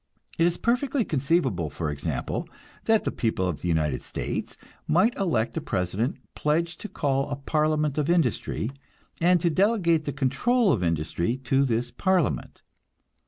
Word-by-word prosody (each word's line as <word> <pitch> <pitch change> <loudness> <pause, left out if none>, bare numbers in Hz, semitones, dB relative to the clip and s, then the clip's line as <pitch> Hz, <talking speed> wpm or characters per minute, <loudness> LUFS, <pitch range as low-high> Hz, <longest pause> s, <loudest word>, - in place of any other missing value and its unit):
It 165 - +5
is 175 - -1
perfectly 250 +1 +1
conceivable, 135 - +1
for 75 +1 -3
example, 75 -1 -3 0.4
that 220 -1 +3
the - - -1
people 110 -5 0
of 85 -4 -3
the - - -3
United 75 -5 +1
States - - -4 0.3
might 195 +9 +3
elect 140 - 0
a - - 0
president 95 - -1 0.2
pledged 165 +3 -1
to 215 - -6
call 135 -1 0
a 140 - -2
parliament 150 +1 0
of 150 +1 0
industry, 135 -7 0 0.5
and 175 +1 +4
to 170 -1 +2
delegate 175 -4 +2
the 145 - -1
control 180 - +2
of 110 - -1
industry 85 - 0
to 135 +2 +2
this 120 0 -1
parliament. 185 -4 0
145 Hz, 155 wpm, -26 LUFS, 110-175 Hz, 0.5 s, It